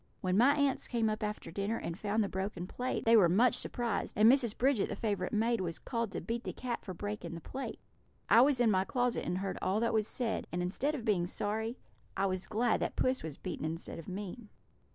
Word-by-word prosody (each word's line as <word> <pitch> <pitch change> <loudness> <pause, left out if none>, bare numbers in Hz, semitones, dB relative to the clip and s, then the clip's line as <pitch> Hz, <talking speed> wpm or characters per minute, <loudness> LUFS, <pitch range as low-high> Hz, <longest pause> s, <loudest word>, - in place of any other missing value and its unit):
When 185 0 +1
my 255 +7 +5
aunts 285 -2 +1
came 230 -3 +1
up 215 - -3
after 210 -4 -4
dinner 200 +5 -1
and 170 - -4
found 210 +3 0
the - - -1
broken 190 -2 -3
plate, 250 +7 -3
they 230 +1 +6
were 190 -6 +6
much 230 +8 +4
surprised, 235 -5 -1
and 215 +1 +7
Mrs. 245 -5 +2
Bridget, 260 -4 +2
the - - -3
favourite 210 -4 -1
maid, 230 0 +1
was 170 -3 -3
called 230 -4 -3
to - - -3
beat 235 +1 -3
the - - -4
cat 245 -2 -4
for 185 - -6
breaking 205 -2 -5
the - - -6
plate. 265 - -6 0.5
I 230 - +7
was 270 -1 +4
in 235 -3 +4
my 190 -1 +3
closet 245 +3 0
and 180 - -1
heard 195 0 -3
all 190 +3 +1
that 230 - +1
was 215 -1 +2
said, 235 -2 -2
and 175 - -2
instead 270 +12 -1
of 240 -6 -6
being 185 -6 +2
sorry, 220 +6 -2 0.4
I 195 - +2
was 185 -1 -1
glad 225 +2 +1
that - - -2
puss 255 0 +1
was 155 -3 -6
beaten 180 -4 -5
instead 165 +2 -4
of 165 - -10
me. 205 +3 -6
215 Hz, 235 wpm, -32 LUFS, 190-240 Hz, 0.5 s, and